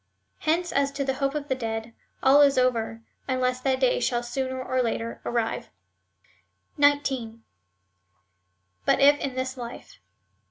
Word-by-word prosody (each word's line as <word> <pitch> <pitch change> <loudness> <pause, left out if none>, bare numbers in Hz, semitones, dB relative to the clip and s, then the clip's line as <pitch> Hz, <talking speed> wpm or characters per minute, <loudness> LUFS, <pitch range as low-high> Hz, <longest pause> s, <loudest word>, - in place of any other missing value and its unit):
Hence 340 +3 0
as 280 0 +1
to 280 0 -2
the 265 - 0
hope 275 +1 -1
of 295 -1 -3
the 265 - +1
dead, 225 -2 -4 0.3
all 275 +2 +7
is 280 -2 +5
over, 230 -3 0 0.2
unless 255 -1 0
that 260 0 +1
day 255 -2 +2
shall 240 -1 0
sooner 260 +2 -3
or 255 0 0
later 230 -1 -3
arrive. 235 -2 -2 1.1
19. 265 -6 +1 1.4
But - - +4
if 285 +1 +6
171 265 -2 -3
this 260 0 -3
life. 240 -1 -9
260 Hz, 145 wpm, -26 LUFS, 240-275 Hz, 1.4 s, all